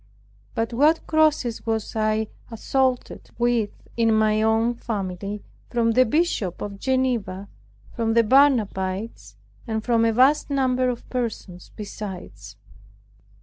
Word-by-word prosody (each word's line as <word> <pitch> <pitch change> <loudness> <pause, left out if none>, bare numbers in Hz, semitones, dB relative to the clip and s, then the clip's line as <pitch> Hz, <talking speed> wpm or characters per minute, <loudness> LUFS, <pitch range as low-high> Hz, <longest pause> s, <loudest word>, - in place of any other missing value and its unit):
But 225 +1 -1
what 300 +7 +3
crosses 305 -7 +1
was 220 -1 -2
I 215 0 +1 0.2
assaulted 255 +2 -1
with 240 -3 +1 0.3
in 230 -1 +2
my 215 0 +3
own 225 +2 +2
family, 200 -3 -5 0.3
from 230 -1 +1
the 255 +3 +4
Bishop 225 - 0
of 200 -1 -6
Geneva, 240 -7 -1 0.5
from 225 -1 -1
the 230 - +5
Barnabites, 220 -5 +1 0.3
and 220 -1 -2
from 230 -1 +2
a 230 - +3
vast 260 +7 +3
number 255 -2 +1
of 240 -1 -5
persons 220 -7 -4
besides! 180 - -8
225 Hz, 120 wpm, -23 LUFS, 210-255 Hz, 0.5 s, the